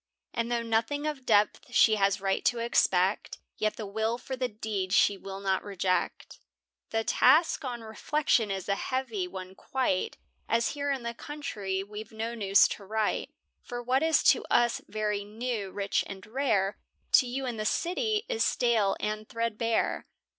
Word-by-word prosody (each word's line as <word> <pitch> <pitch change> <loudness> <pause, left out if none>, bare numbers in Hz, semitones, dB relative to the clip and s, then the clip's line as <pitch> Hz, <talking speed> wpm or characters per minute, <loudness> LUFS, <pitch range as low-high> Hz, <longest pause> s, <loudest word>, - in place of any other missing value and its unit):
And 235 0 -2
though 235 -1 0
nothing 230 +6 0
of 290 -4 -4
depth 210 -1 +2
she 220 - +6
has 200 0 +2
right 195 0 0
to 245 - +3
expect; 195 -4 +1 0.2
Yet 215 0 +1
the 220 - -6
will 220 +3 -1
for 260 +1 -6
the 255 0 -1
deed 205 -4 -3
she 205 0 +5
will 195 0 -8
not 190 -1 0
reject 190 -2 -2 0.5
The 225 0 0
task, 305 +8 +4
on 245 -3 -4
reflection, 225 +1 0
is 190 -2 -3
a 200 - +2
heavy 230 -4 -2
one 185 0 -8
quite, 220 -3 -1 0.3
As 230 +1 +2
here 285 -1 -3
in 265 -3 -2
the 235 0 -3
country 215 -9 -4
we've 210 +2 -8
no 225 +1 -4
news 200 -4 +5
to 205 - -6
write; 215 +1 -1 0.3
For 245 0 -6
what 255 +3 +2
is 320 0 +3
to - - -5
us 240 -1 +3
very 210 -1 -1
new, 215 -1 -4
rich, 200 +1 -1
and 195 -1 -8
rare, 215 -5 0 0.3
To 255 - +6
you 265 +2 -3
in 245 -3 -3
the 215 - -2
city 420 - 0
is 475 -2 0
stale 225 -5 +2
and 215 0 -3
thread 230 -2 -2
bare. 230 0 0
220 Hz, 175 wpm, -29 LUFS, 200-250 Hz, 0.5 s, she